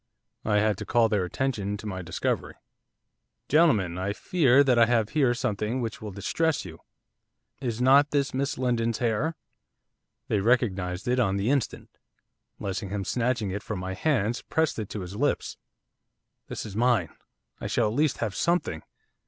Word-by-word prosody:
I 105 -1 +2
had 105 -1 +2
to - - -5
call 115 -1 +3
their 100 -4 +1
attention 105 -2 -2
to 105 - -10
my 95 -3 -4
discovery. 85 - -2 0.9
'Gentlemen, 110 - +3
I 95 +2 -1
fear 140 - +4
that 125 -4 +3
I 115 - +6
have 115 -3 +2
here 130 -4 +2
something 105 +2 -1
which 115 -3 -4
will 110 - -5
distress 145 - -1
you, - - -10 0.8
is 120 -4 -3
not 140 +3 +6
this 140 -2 0
Miss 140 +2 -1
Lindon's 115 -3 0
hair?' 125 +7 0 0.9
They 105 - +1
recognised 95 -4 0
it 125 +1 +2
on 100 -5 +2
the 100 +6 +1
instant. 140 -6 -2 0.6
Lessingham, 100 0 -3
snatching 120 -2 0
it 100 +2 -3
from 110 - -5
my 95 +1 -4
hands, 120 -1 0
pressed 160 -5 0
it 105 - -4
to 105 - -5
his 90 +2 -7
lips. 145 +6 -1 0.9
'This - - -5
is 100 -3 -8
mine, 115 -7 +2 0.5
I - - -4
shall 115 - +1
at 105 - -2
least 150 +2 +1
have 110 -4 -2
something. 170 - 0
115 Hz, 165 wpm, -27 LUFS, 100-130 Hz, 0.9 s, I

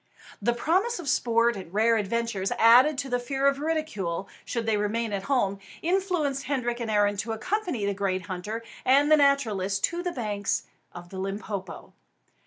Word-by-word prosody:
The 240 - +2
promise 375 - +1
of 345 -5 -7
sport 235 -2 +2
and 185 -4 -8
rare 225 +3 +3
adventures, 210 -2 -1
added 250 +6 +6
to 275 - -2
the 245 -1 0
fear 270 +2 -2
of 280 0 +3
ridicule 210 - -2 0.2
should 235 -2 -3
they 220 -1 +2
remain 210 +2 -1
at 195 - -1
home, 200 -8 +1 0.2
influenced 345 -6 0
Hendrik 245 -4 -1
and 230 -2 -3
Arend 205 -1 +2
to 225 +3 -2
accompany 345 - -2
the 200 - 0
great 190 -2 -1
hunter 205 +6 -5 0.2
and 285 +3 +4
the 310 - +8
naturalist 220 -10 +2
to 345 +1 0
the 355 0 -2
banks 210 -7 -2 0.3
of 175 0 -10
the 190 - -7
Limpopo. 195 0 -5
230 Hz, 175 wpm, -27 LUFS, 200-280 Hz, 0.3 s, the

